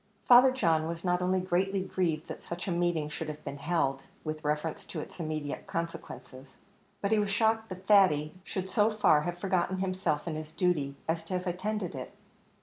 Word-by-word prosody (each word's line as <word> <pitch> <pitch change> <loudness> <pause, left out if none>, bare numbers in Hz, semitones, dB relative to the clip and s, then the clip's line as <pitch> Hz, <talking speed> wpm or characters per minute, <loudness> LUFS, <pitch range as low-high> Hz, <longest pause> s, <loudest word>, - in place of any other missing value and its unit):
Father 250 +2 +8
John 165 -11 +2
was 165 0 -5
not 180 0 +2
only 185 +1 +2
greatly 185 +1 0
grieved 170 -5 -1
that - - -7
such 175 +3 -6
a - - 0
meeting 170 -3 +1
should 150 +1 -5
have 150 0 -7
been 140 0 -5
held, 140 -3 0 0.2
with 155 0 -4
reference 150 +2 -1
to 165 - -6
its 150 - -9
immediate 155 -3 -4
consequences, 135 -5 -6 0.4
but 200 - 0
he 220 - +4
was 205 -1 0
shocked 220 +2 +2
that 185 0 -8
Thady 170 -8 +5
should 190 -1 -4
so 210 -1 +4
far 210 -9 +4
have 175 +2 -3
forgotten 185 0 0
himself 185 -5 -1
and 165 -3 -3
his 155 0 -7
duty 160 -6 +1
as 165 0 0
to 185 - -5
have 180 +1 -1
attended 185 +1 -2
it. 130 -1 -7
175 Hz, 195 wpm, -30 LUFS, 155-190 Hz, 0.4 s, Father